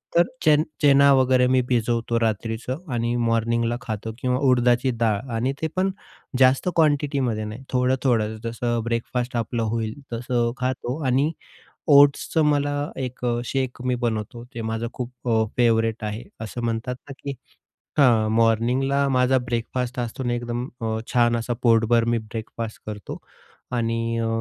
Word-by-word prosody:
तर 170 - +7 0.2
चेन 150 -1 +5 0.2
चना 140 -1 +6
वगैरे 130 -1 +4
मी 130 0 +3
भिजवतो 115 -1 +1
रात्रीचं 115 +3 -2 0.2
आणि 120 0 0
मॉर्निंगला 115 0 +1
खातो 110 -2 -4
किंवा 125 0 0
उडदाची 125 0 +3
डाळ 110 -3 +2 0.2
आणि 125 +4 0
ते 160 - +1
पण 190 +1 +1 0.5
जास्त 130 +6 +4
क्वांटिटीमध्ये 140 -7 +1
नाही. 110 +5 -7
थोडं-थोडं, 125 -4 +1
जसं 120 +1 -1
ब्रेकफास्ट 120 +2 -2
आपलं 115 0 -1
होईल 110 0 -2 0.2
तसं 120 0 0
खातो 125 0 -2
आणि 135 +4 +2 0.6
ओट्सचं 145 +3 +5
मला 145 -1 +2 0.3
1 125 -1 -5 0.2
शेक 130 -1 -2
मी 125 0 +1
बनवतो, 115 0 -2
ते 115 - -5
माझं 110 +1 -2
खूप 125 -1 -5 0.2
अ, 110 -1 +3
फेवरेट 115 -2 +2
आहे. 105 +2 -4 0.2
असं 110 +2 -5
म्हणतात 115 +2 -2
ना - - -6
की 140 - -3 0.6
हां, 115 -6 +4
मॉर्निंगला 125 +5 +2
माझा 130 0 +3
ब्रेकफास्ट 125 +1 -3
असतो 120 +2 -4
ना 120 -1 0
एकदम 120 +1 -3
अ, 110 -1 -1 0.2
छान 120 -1 +4
असा 115 +1 -2
पोटभर 115 0 +4
मी 120 0 +1
ब्रेकफास्ट 110 0 -6
करतो. 105 -1 -6 0.5
आणि 115 -1 -1
अ, 115 - 0
120 Hz, 145 wpm, -23 LUFS, 115-130 Hz, 0.6 s, तर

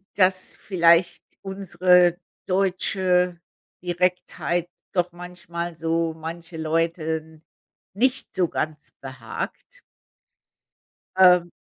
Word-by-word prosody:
dass 185 -1 +2
vielleicht 170 -2 +3 0.2
unsere 180 -2 +3 0.3
deutsche 185 -1 +1 0.4
Direktheit 175 -1 -1 0.2
doch 180 -1 +1
manchmal 175 -1 -7
so 165 0 -1
manche 165 +1 -8
Leuten 160 0 -2 0.5
nicht 260 +4 0
so 180 -2 +2
ganz 155 -2 -4
behagt. 130 -4 -7 1.4
Ähm 180 -2 +6
175 Hz, 75 wpm, -24 LUFS, 165-180 Hz, 1.4 s, Ähm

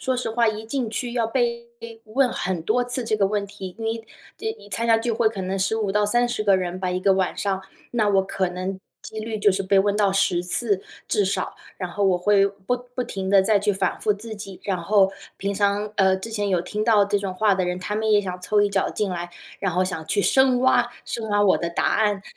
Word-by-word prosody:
说 260 -1 0
实 250 - -2
话， 230 -1 +3
一 215 0 -4
进 240 -2 -2
去 240 +1 -3
要 235 -2 +1
被 235 -1 -1 0.4
问 255 +4 +2
很 180 -1 -2
多 225 +8 +1
次 245 0 -2
这 220 - 0
个 200 -2 +3
问 205 0 -1
题， 190 -2 -9
你 225 0 -3 0.3
这 440 0 -3
参 230 +2 -1
加 225 -1 +5
聚 230 0 -1
会 220 0 +3
可 210 -3 -6
能 190 +1 -2
15 200 +1 0
到 210 0 +2
30 240 0 +1
个 200 -2 +4
人 180 0 -3
吧 185 -1 -1
一 180 - -1
个 195 +1 +4
晚 190 -1 0
上， 195 -1 -1 0.3
那 220 -3 +2
我 195 -1 +3
可 190 -1 -1
能 185 +1 -4 0.2
机 220 - -7
率 220 0 -4
就 205 -1 +4
是 195 +1 -1
被 195 +1 +3
问 200 +1 +2
到 205 -2 +3
10 190 -3 +1
次 200 +2 0 0.2
至 205 - +1
少， 195 - -2 0.2
然 180 -2 -4
后 205 - -3
我 190 -2 +4
会 200 +2 +3
不 200 +4 -3 0.2
不 250 - -1
停 190 -5 -5
地 195 -1 +5
再 210 0 +3
去 205 +1 +1
反 190 - -1
复 210 - +2
自 220 +2 -8
己。 195 -3 -9
然 190 -3 -1
后 195 +1 +3 0.2
平 200 +1 -2
常 205 +1 0
呃， 190 -1 +4
之 210 +4 -7
前 205 -2 -1
有 185 -3 +2
听 210 +4 -3
到 215 -2 +4
这 205 0 0
种 195 -2 -4
话 205 0 +3
的 185 -1 0
人， 180 0 -2
他 195 +3 -4
们 220 +1 0
也 210 - +6
想 180 -2 -5
凑 205 +3 +2
一 205 - +3
脚 - - +1
进 210 -2 -2
来， 175 -1 -4 0.3
然 195 - -1
后 185 +2 +2
想 160 -4 -4
去 200 0 +1
深 260 +1 +4
挖 245 -2 +3
深 225 -2 -4
挖 205 0 +2
我 190 - +4
的 170 - -2
答 170 - -2
案， 205 -2 +1
205 Hz, 260 characters per minute, -23 LUFS, 190-225 Hz, 0.4 s, 也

